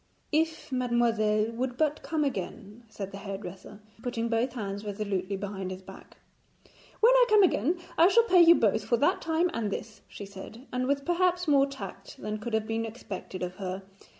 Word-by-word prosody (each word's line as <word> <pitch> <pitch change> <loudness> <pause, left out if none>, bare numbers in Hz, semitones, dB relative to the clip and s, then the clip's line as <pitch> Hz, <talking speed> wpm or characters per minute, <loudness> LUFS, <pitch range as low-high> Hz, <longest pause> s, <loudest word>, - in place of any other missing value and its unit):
'If 320 -1 0
mademoiselle 230 -4 +1
would 245 +1 -3
but 305 -1 +1
come 315 -2 -1
again,' 210 -2 -4
said 195 -2 -6
the 195 - -8
hairdresser, 195 0 -8 0.2
putting 235 -2 -2
both 235 +2 0
hands 205 -4 -4
resolutely 200 -2 -2
behind 195 -1 -5
his 185 0 -7
back. - - -13 0.8
'When 470 +3 +7
I - - +6
come 425 -1 +6
again 335 - +2 0.2
I 335 - +8
shall 465 +4 +5
pay 370 -6 +5
you 340 0 +8
both 220 -4 +2
for 235 +3 +1
that 285 - +2
time 330 +2 +1
and 225 -3 -1
this,' 215 +2 -6
she 200 - -9
said, 200 +5 -11
with 275 +2 0
perhaps 355 0 +1
more 280 -2 +5
tact 275 - -9
than 215 0 -4
could 220 +1 -2
have 220 -1 0
been 225 0 -1
expected 205 -5 -6
of 180 +1 -5
her. 190 -1 -4
230 Hz, 180 wpm, -28 LUFS, 205-295 Hz, 0.8 s, I